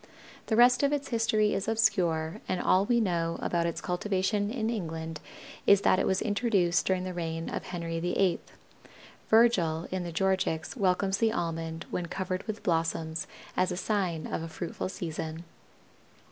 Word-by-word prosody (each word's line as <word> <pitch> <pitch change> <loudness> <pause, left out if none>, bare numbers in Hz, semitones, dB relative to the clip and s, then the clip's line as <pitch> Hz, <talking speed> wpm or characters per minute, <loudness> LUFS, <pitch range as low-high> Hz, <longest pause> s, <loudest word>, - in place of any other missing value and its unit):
The 220 - +1
rest 245 +2 +6
of 280 0 +3
its 285 -1 -2
history 215 -2 +2
is 195 - -2
obscure 170 -8 +1
and 185 - 0
all 190 +2 +3
we 240 -1 +3
know 170 -5 0
about 170 -1 0
its 170 - -3
cultivation 195 +3 0
in 220 -1 -2
England 160 -6 -4 0.5
is 200 -1 +7
that 185 - +4
it - - +1
was 190 0 +1
introduced 205 -5 +1
during 185 -1 +1
the 185 0 -4
reign 165 -1 -4
of - - -4
Henry 170 -2 -4
VIII. 180 +1 +1 0.9
Virgil 185 -8 +4
in 185 -1 -2
the 175 - -5
Georgics 190 -1 0
welcomes 190 -2 +1
the 225 -1 +3
Almond 165 -3 -3
when 175 -1 -2
covered 185 +1 -3
with 215 -1 -5
blossoms 165 -1 -1 0.3
as 185 - +2
the 180 - -3
sign 185 -6 -1
of - - -3
a 165 - -5
fruitful 170 +2 -5
season. 160 -2 -5
185 Hz, 165 wpm, -29 LUFS, 165-205 Hz, 0.9 s, is